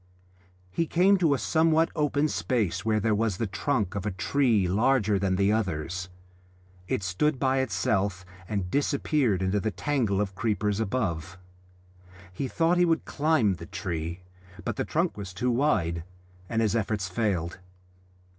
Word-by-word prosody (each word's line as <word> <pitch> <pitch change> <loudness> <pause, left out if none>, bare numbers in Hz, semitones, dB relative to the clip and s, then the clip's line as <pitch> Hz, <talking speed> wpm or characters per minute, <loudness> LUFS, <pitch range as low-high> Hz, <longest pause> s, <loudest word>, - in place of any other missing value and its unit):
He 165 - 0
came 190 +5 +4
to 160 -5 +3
a - - -1
somewhat 160 +2 +2
open 150 -1 +1
space 105 - -1
where 110 -1 +2
there 110 +1 +1
was 105 -3 0
the 115 - -1
trunk 105 0 -1
of 100 -2 -3
a 105 - -1
tree 105 +2 +1
larger 105 +1 +2
than 95 -1 +1
the 100 +2 +2
others; 95 -3 -2 0.8
it 100 - -1
stood 130 - 0
by 130 0 +1
itself 95 -4 0 0.2
and 100 -4 -2
disappeared 140 - +1
into 95 +2 +1
the 110 - -1
tangle 115 -5 0
of 100 -2 -1
creepers 105 0 -1
above. 95 -7 -2 1.0
He 135 +8 -3
thought 165 +6 +2
he 180 - +5
would 165 -1 +1
climb 145 -9 +2
the 85 -1 -9
tree, 85 -2 -4 0.4
but 120 - -2
the - - -2
trunk 170 -2 0
was 95 -3 -7
too 125 +4 0
wide, 100 - +1 0.5
and 115 0 +1
his 110 0 +1
efforts 105 -3 -1
failed. 90 -3 -1
105 Hz, 155 wpm, -27 LUFS, 95-135 Hz, 1.0 s, he